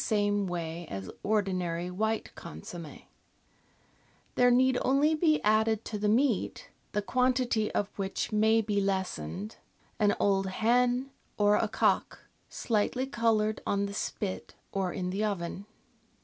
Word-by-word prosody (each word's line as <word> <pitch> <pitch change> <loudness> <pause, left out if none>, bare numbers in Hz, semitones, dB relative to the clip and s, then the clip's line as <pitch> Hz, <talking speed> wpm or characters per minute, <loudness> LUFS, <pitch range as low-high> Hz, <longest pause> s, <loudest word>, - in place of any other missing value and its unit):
e 205 -1 +2
way 175 -4 -2
as 95 -2 -6
ordinary 180 -4 -1
white 220 +4 -1
consomm^. 155 - -9 1.3
There 245 0 +4
need 255 +1 +4
only 280 +4 +3
be 310 -1 +3
added 220 +1 +2
to 210 - -4
the 210 0 +1
meat, 235 -1 +1 0.2
the 210 - 0
quantity 250 -2 +1
of 205 - +1
which 195 +3 -2
may 220 +1 +4
be 205 -1 0
lessened, 190 - -3 0.4
an 210 -1 +3
old 195 -1 +2
hen 245 +6 +1 0.3
or 205 0 +4
a - - +2
cock, - - 0 0.3
slightly 235 +3 0
coloured 220 -4 +1
on 200 0 +1
the 200 - -5
spit 200 -1 -4 0.2
or 190 -2 -1
in 180 0 -3
the 200 +3 -1
oven. 195 -1 -3
210 Hz, 135 wpm, -29 LUFS, 190-230 Hz, 1.3 s, There